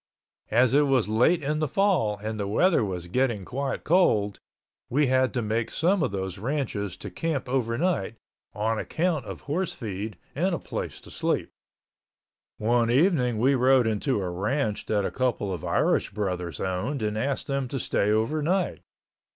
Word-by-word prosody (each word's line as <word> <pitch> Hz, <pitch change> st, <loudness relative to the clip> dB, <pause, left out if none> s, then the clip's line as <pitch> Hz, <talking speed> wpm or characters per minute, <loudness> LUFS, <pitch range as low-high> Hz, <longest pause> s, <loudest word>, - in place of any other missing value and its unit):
As 120 Hz, +3 st, +3 dB
it 145 Hz, +1 st, +4 dB
was 130 Hz, -5 st, +2 dB
late 125 Hz, +10 st, +3 dB
in 150 Hz, +2 st, 0 dB
the 155 Hz, -, +1 dB
fall 175 Hz, -, +2 dB
and 110 Hz, +1 st, -5 dB
the 100 Hz, -, -1 dB
weather 160 Hz, -, +3 dB
was 90 Hz, -4 st, -4 dB
getting 115 Hz, 0 st, 0 dB
quite 135 Hz, +4 st, -3 dB
cold, 110 Hz, -, +3 dB, 0.5 s
we 145 Hz, +4 st, +3 dB
had 130 Hz, 0 st, +2 dB
to 120 Hz, -, 0 dB
make 110 Hz, +2 st, -1 dB
some 180 Hz, +4 st, +1 dB
of -, -, +1 dB
those 95 Hz, -2 st, -4 dB
ranches 110 Hz, -, -2 dB
to -, -, -8 dB
camp 160 Hz, -6 st, -2 dB
overnight, 125 Hz, -, 0 dB, 0.4 s
on 110 Hz, +1 st, -1 dB
account 160 Hz, -6 st, -1 dB
of -, -, -7 dB
horse 170 Hz, +5 st, -2 dB
feed 105 Hz, -3 st, -5 dB, 0.2 s
and 175 Hz, +5 st, +1 dB
a -, -, -2 dB
place -, -, -5 dB
to -, -, -13 dB
sleep. -, -, -1 dB, 1.1 s
One 115 Hz, +1 st, +2 dB
evening 130 Hz, -, +3 dB
we 130 Hz, +5 st, +3 dB
rode 130 Hz, -1 st, +4 dB
into 110 Hz, +3 st, 0 dB
a 95 Hz, -2 st, -2 dB
ranch 105 Hz, +5 st, -1 dB
that 105 Hz, -2 st, +1 dB
a -, -, -2 dB
couple 120 Hz, -7 st, -1 dB
of 85 Hz, -, -6 dB
Irish -, -, +1 dB
brothers 90 Hz, -6 st, -3 dB
owned 95 Hz, +8 st, -2 dB
and 105 Hz, 0 st, -1 dB
asked 130 Hz, +5 st, -1 dB
them 135 Hz, -1 st, -1 dB
to 135 Hz, +2 st, -3 dB
stay 105 Hz, -, 0 dB
overnight. 155 Hz, -, +1 dB
120 Hz, 170 wpm, -26 LUFS, 105-145 Hz, 1.1 s, it